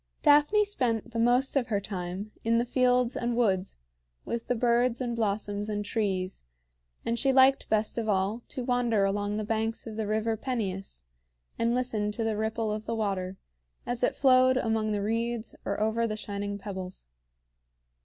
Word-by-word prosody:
Daphne 295 Hz, +8 st, +5 dB
spent 245 Hz, -, -1 dB
the 230 Hz, -, -3 dB
most 245 Hz, +4 st, +3 dB
of 260 Hz, -4 st, +2 dB
her 210 Hz, -4 st, 0 dB
time 190 Hz, +1 st, -5 dB
in 230 Hz, +1 st, +2 dB
the 235 Hz, -, +2 dB
fields 250 Hz, 0 st, +2 dB
and 240 Hz, 0 st, -1 dB
woods, 195 Hz, -5 st, +1 dB, 0.5 s
with 235 Hz, -1 st, -4 dB
the 245 Hz, -, +1 dB
birds 240 Hz, +1 st, +2 dB
and 240 Hz, -2 st, -2 dB
blossoms 205 Hz, -1 st, -1 dB
and 205 Hz, -1 st, -2 dB
trees; 195 Hz, -, -2 dB, 0.6 s
and 230 Hz, 0 st, 0 dB
she 270 Hz, -, +3 dB
liked 265 Hz, +1 st, +5 dB
best 215 Hz, +1 st, +1 dB
of 220 Hz, -1 st, -2 dB
all 200 Hz, +4 st, 0 dB
to 255 Hz, -, -5 dB
wander 240 Hz, -5 st, +2 dB
along 205 Hz, +1 st, -1 dB
the 215 Hz, -, -2 dB
banks 225 Hz, +1 st, -1 dB
of 220 Hz, -2 st, -7 dB
the 220 Hz, -2 st, -2 dB
River 220 Hz, +1 st, 0 dB
Peneus, 200 Hz, -, -4 dB, 0.6 s
and 230 Hz, +1 st, +2 dB
listen 220 Hz, -5 st, -1 dB
to 225 Hz, -, -2 dB
the 225 Hz, -1 st, 0 dB
ripple 220 Hz, +1 st, -1 dB
of 215 Hz, +1 st, -4 dB
the 230 Hz, -, -1 dB
water 195 Hz, -3 st, -2 dB, 0.5 s
as 245 Hz, 0 st, -2 dB
it 245 Hz, -, +1 dB
flowed 255 Hz, -1 st, +5 dB
among 220 Hz, -3 st, 0 dB
the 205 Hz, -1 st, -1 dB
reeds 230 Hz, +1 st, -2 dB
or -, -, -2 dB
over 220 Hz, +2 st, +1 dB
the 215 Hz, -1 st, -3 dB
shining 200 Hz, -1 st, -4 dB
pebbles. 190 Hz, -2 st, -7 dB
225 Hz, 175 wpm, -28 LUFS, 205-245 Hz, 0.6 s, Daphne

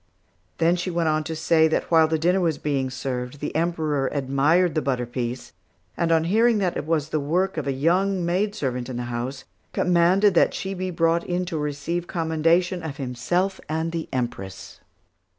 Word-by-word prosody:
Then 170 Hz, +1 st, +3 dB
she 180 Hz, +1 st, -3 dB
went 170 Hz, -2 st, 0 dB
on 155 Hz, 0 st, +1 dB
to 160 Hz, -, -4 dB
say 160 Hz, 0 st, +3 dB
that 160 Hz, -, -1 dB
while 160 Hz, -1 st, +6 dB
the 160 Hz, 0 st, 0 dB
dinner 175 Hz, +4 st, +2 dB
was 165 Hz, -4 st, +1 dB
being 135 Hz, -3 st, -1 dB
served, 130 Hz, 0 st, -4 dB
the 150 Hz, -, -5 dB
Emperor 155 Hz, -4 st, 0 dB
admired 145 Hz, +6 st, +2 dB
the 155 Hz, -, 0 dB
butter 125 Hz, -2 st, -1 dB
piece, 120 Hz, 0 st, -5 dB, 0.4 s
and 170 Hz, -1 st, 0 dB
on 160 Hz, -1 st, +4 dB
hearing 220 Hz, +6 st, +3 dB
that 185 Hz, -4 st, 0 dB
it 145 Hz, -, -4 dB
was 155 Hz, -2 st, 0 dB
the 155 Hz, -, 0 dB
work 180 Hz, +7 st, 0 dB
of 155 Hz, -3 st, -3 dB
a -, -, +1 dB
young 180 Hz, +6 st, +1 dB
maidservant 170 Hz, -, -1 dB
in 125 Hz, -, -4 dB
the 125 Hz, -, -3 dB
house, 130 Hz, +3 st, -4 dB, 0.3 s
commanded 180 Hz, +3 st, +3 dB
that 170 Hz, -, +3 dB
she 190 Hz, 0 st, -3 dB
be 185 Hz, 0 st, -3 dB
brought 165 Hz, -1 st, +1 dB
in 180 Hz, +1 st, -2 dB
to 175 Hz, -2 st, -5 dB
receive 150 Hz, +4 st, -3 dB
commendation 170 Hz, +2 st, +1 dB
of 160 Hz, -4 st, -6 dB
himself 175 Hz, +10 st, -1 dB
and 160 Hz, +1 st, -1 dB
the 165 Hz, -1 st, -4 dB
Empress. 110 Hz, -7 st, -5 dB
160 Hz, 185 wpm, -24 LUFS, 140-175 Hz, 0.4 s, while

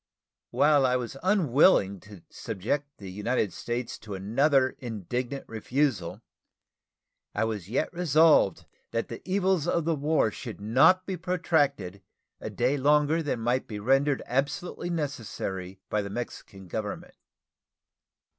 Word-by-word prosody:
While 145 Hz, -2 st, +4 dB
I 125 Hz, -1 st, +3 dB
was 125 Hz, 0 st, -3 dB
unwilling 150 Hz, -, +3 dB
to 100 Hz, -2 st, -14 dB
subject 120 Hz, +7 st, -3 dB
the 95 Hz, -2 st, -9 dB
United 105 Hz, 0 st, -1 dB
States 120 Hz, +4 st, -4 dB
to 105 Hz, -2 st, -7 dB
another 130 Hz, +7 st, +2 dB
indignant 120 Hz, +3 st, -4 dB
refusal, 115 Hz, -, -1 dB, 1.1 s
I -, -, +1 dB
was 105 Hz, -5 st, -3 dB
yet 135 Hz, +9 st, -1 dB
resolved 160 Hz, -, +4 dB, 0.2 s
that 115 Hz, 0 st, -2 dB
the 115 Hz, -, -7 dB
evils 190 Hz, -4 st, +1 dB
of 170 Hz, -2 st, +1 dB
the 165 Hz, -, +2 dB
war 150 Hz, -5 st, +1 dB
should 115 Hz, 0 st, -8 dB
not 150 Hz, -, +4 dB
be 190 Hz, -2 st, -3 dB
protracted 145 Hz, -, 0 dB, 0.4 s
a -, -, -5 dB
day 125 Hz, +4 st, 0 dB
longer 150 Hz, +3 st, +3 dB
than 145 Hz, -6 st, -2 dB
might 120 Hz, +3 st, 0 dB
be 105 Hz, -, -6 dB
rendered 135 Hz, +5 st, +2 dB
absolutely 150 Hz, +7 st, -2 dB
necessary 105 Hz, -, -4 dB
by 105 Hz, -, 0 dB
the 100 Hz, -, -6 dB
Mexican 100 Hz, -3 st, -7 dB
Government. 105 Hz, +2 st, -5 dB
130 Hz, 130 wpm, -27 LUFS, 105-150 Hz, 1.1 s, While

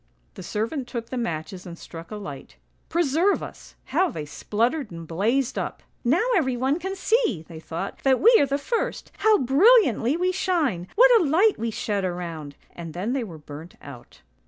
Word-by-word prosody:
" -, -, -40 dB
The -, -, -10 dB
servant 245 Hz, +5 st, -3 dB
took 235 Hz, -2 st, -5 dB
the -, -, -3 dB
matches 180 Hz, -3 st, -4 dB
and 170 Hz, -1 st, -8 dB
struck 165 Hz, 0 st, -10 dB
a 215 Hz, -, -6 dB
light; 145 Hz, -, -8 dB, 0.3 s
preserve 340 Hz, +4 st, +2 dB
us! -, -, -11 dB, 0.2 s
how 370 Hz, -1 st, +3 dB
they 155 Hz, -2 st, -6 dB
spluttered 235 Hz, -, -1 dB
and 165 Hz, -1 st, -9 dB
blazed 230 Hz, -, 0 dB
up. -, -, -5 dB
" -, -, -41 dB
' -, -, -39 dB
Now 350 Hz, -, +3 dB
everyone 265 Hz, -1 st, +1 dB
can 380 Hz, +2 st, -4 dB
see,' 390 Hz, -, +1 dB
they 165 Hz, -2 st, -9 dB
thought, 165 Hz, +4 st, -6 dB
' -, -, -23 dB
that 265 Hz, -1 st, +3 dB
we 470 Hz, +3 st, +6 dB
are 285 Hz, -, +3 dB
the 275 Hz, +1 st, 0 dB
first. 475 Hz, +11 st, -3 dB
How 435 Hz, -1 st, +5 dB
brilliantly 280 Hz, -, +4 dB
we 365 Hz, +1 st, +1 dB
shine! 315 Hz, -, 0 dB
What -, -, +7 dB
a -, -, +1 dB
light 370 Hz, +9 st, +3 dB
we 230 Hz, -, -1 dB
shed 205 Hz, -2 st, -2 dB
around! 170 Hz, -5 st, -5 dB
' -, -, -31 dB
— -, -, -31 dB
And 165 Hz, -2 st, -8 dB
then 205 Hz, +8 st, -2 dB
they 270 Hz, -2 st, -1 dB
were 175 Hz, -8 st, -8 dB
burnt 150 Hz, +3 st, -11 dB
out." 135 Hz, -4 st, -13 dB
235 Hz, 205 wpm, -24 LUFS, -, 0.3 s, What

